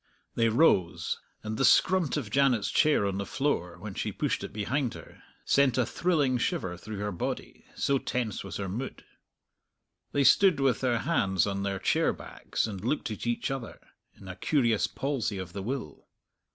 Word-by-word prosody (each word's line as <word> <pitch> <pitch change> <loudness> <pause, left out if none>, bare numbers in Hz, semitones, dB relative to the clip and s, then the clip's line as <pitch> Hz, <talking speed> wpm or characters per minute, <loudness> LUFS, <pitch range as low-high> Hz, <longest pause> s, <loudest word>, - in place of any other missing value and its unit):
They 115 -1 +2
rose, 110 - +2 0.2
and 110 0 -4
the - - +1
scrunt 180 0 +4
of 115 -8 -4
Janet's 130 -5 +2
chair 150 -9 +3
on 100 0 -1
the - - -1
floor, 110 -12 -1
when 105 -2 -7
she - - -3
pushed - - -1
it - - -6
behind 120 +5 -1
her, - - -13 0.2
sent 140 -3 +3
a 125 - +3
thrilling 145 -4 +1
shiver 90 -5 -1
through 105 +4 -8
her 105 +1 -2
body, 85 - -5
so 140 -1 +1
tense 120 -6 -2
was 95 -4 -6
her 100 - -3
mood. 120 +8 -5 1.1
They 145 - +2
stood 180 +5 +5
with 135 -5 +2
their 125 -3 +2
hands 95 - +1
on 100 -1 -2
their 100 -1 -1
chair - - +2
backs, - - -4
and 100 -4 -6
looked 125 0 -1
at 110 - -5
each 120 +2 -1
other, 135 -4 -5 0.4
in 95 - -14
a 90 - -6
curious 120 -4 +2
palsy 135 -7 -2
of 95 -2 -6
the 100 - -4
will. 115 - -5
115 Hz, 180 wpm, -28 LUFS, 100-135 Hz, 1.1 s, stood